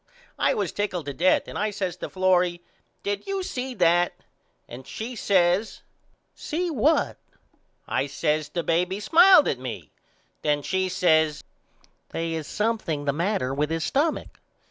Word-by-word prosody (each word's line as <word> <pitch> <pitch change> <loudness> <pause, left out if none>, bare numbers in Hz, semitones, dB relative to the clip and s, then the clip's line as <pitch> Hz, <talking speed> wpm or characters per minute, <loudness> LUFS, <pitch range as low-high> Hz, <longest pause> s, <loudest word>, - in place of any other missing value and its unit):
I - - +2
was 200 -6 -1
tickled 185 -6 -3
to 140 - -4
death 180 +6 +2
and - - -6
I 215 - +1
says 195 -4 -3
to - - -6
Florrie 180 -2 +1 0.4
Did 200 - -3
you 390 -1 -2
see 255 -6 -4
that. 175 -1 +3 0.5
And 125 +2 -10
she 235 +3 -6
says 190 0 +1 0.5
See 345 +3 -3
what. 300 +4 +2 0.7
I 135 - 0
says 150 +1 -1
The 170 - -3
baby 180 +4 0
smiled 340 - +6
at 130 - -1
me. 115 - -7 0.5
Then 145 -1 0
she 190 +2 0
says 160 -4 +2 0.7
They 165 0 -3
is 160 -2 -4
something 210 -9 -2
the 140 - +1
matter 165 -5 -1
with 150 +2 -1
his 165 0 -2
stumach. 300 - -1
180 Hz, 150 wpm, -25 LUFS, 155-210 Hz, 0.7 s, smiled